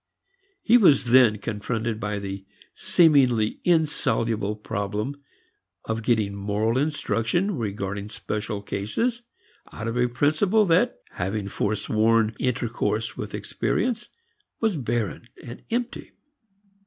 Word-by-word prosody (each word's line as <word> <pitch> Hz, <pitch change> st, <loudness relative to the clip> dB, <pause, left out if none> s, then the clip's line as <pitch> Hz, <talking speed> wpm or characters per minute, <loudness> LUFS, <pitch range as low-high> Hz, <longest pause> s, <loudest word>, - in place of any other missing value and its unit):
He 240 Hz, +2 st, +6 dB
was 140 Hz, -, +4 dB
then 120 Hz, -4 st, +6 dB
confronted 110 Hz, +2 st, -3 dB
by 105 Hz, -1 st, -2 dB
the 95 Hz, -1 st, -5 dB, 0.3 s
seemingly 130 Hz, -10 st, +3 dB
insoluble 115 Hz, -, +1 dB
problem 105 Hz, +6 st, -4 dB, 0.6 s
of 115 Hz, 0 st, -2 dB
getting 110 Hz, -3 st, +1 dB
moral 105 Hz, +3 st, -1 dB
instruction 150 Hz, -, 0 dB
regarding 100 Hz, -3 st, -4 dB
special 105 Hz, -1 st, -4 dB
cases 225 Hz, -, -2 dB, 0.5 s
out 110 Hz, -, -6 dB
of 115 Hz, +1 st, -2 dB
a 125 Hz, 0 st, +3 dB
principle 155 Hz, -, +2 dB
that 185 Hz, +8 st, +2 dB
having 100 Hz, +3 st, -3 dB
forsworn 110 Hz, +2 st, +1 dB
intercourse 115 Hz, -3 st, -1 dB
with -, -, -5 dB
experience 235 Hz, 0 st, -2 dB, 0.5 s
was 220 Hz, -4 st, +1 dB
barren 120 Hz, -4 st, -2 dB, 0.2 s
and 120 Hz, 0 st, -9 dB
empty. 240 Hz, +1 st, -3 dB
115 Hz, 105 wpm, -25 LUFS, 105-150 Hz, 0.6 s, He